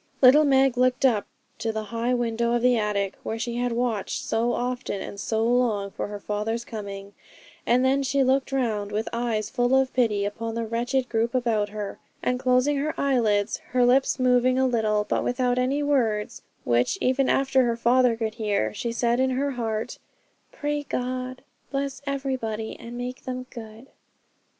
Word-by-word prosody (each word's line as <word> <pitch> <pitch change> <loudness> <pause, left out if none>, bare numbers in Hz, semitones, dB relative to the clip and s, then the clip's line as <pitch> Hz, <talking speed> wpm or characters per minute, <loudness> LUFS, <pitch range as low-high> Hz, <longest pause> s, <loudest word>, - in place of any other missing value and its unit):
Little 280 +4 +7
Meg 265 -2 +3
looked 255 +2 +3
up 220 -6 +2 0.3
to 225 - -1
the 220 0 -3
high 235 +2 +1
window 235 0 0
of 240 0 +1
the 250 0 +5
attic, 205 -3 -1
where 225 - -4
she 235 +1 -3
had 245 0 0
watched 240 +3 -1
so 235 -1 +1
often 245 -4 -2
and 200 - -7
so 220 +2 -1
long 230 -5 +1
for - - -4
her 205 0 -6
father's 215 +3 -3
coming; 200 -2 -7 0.5
and 250 +2 +3
then 270 +1 +3
she 275 0 +1
looked 265 +1 +1
round, 220 -6 -1
with 215 +2 -2
eyes 230 -3 -1
full 245 +2 +2
of 265 -1 0
pity, 215 -5 +1
upon 225 +2 -4
the 230 0 -2
wretched 245 +3 -1
group 230 +1 0
about 225 -4 +1
her; 205 -1 -6 0.2
and 250 0 0
closing 255 +3 +2
her 300 +3 -2
eyelids, 225 -6 +1 0.2
her 250 -1 +4
lips 260 +2 +3
moving 255 0 +3
a 265 - +3
little, 220 -4 +1
but - - 0
without 250 0 0
any 270 +3 +1
words 230 -8 0 0.2
which 120 0 +1
even 260 +1 +2
her 260 -3 +2
father 240 0 +3
could 220 -1 -2
hear, 205 - -1
she 235 - -3
said 235 +1 +1
in 260 0 +3
her 275 +2 0
heart, 225 -4 -3 0.5
'Pray 295 0 -2
God, 255 -1 -4 0.3
bless 275 -1 -3
everybody, 260 -6 -3
and 235 +1 -8
make 250 +1 -6
them 255 0 -4
good.' 225 +1 -10
240 Hz, 175 wpm, -25 LUFS, 220-255 Hz, 0.5 s, Little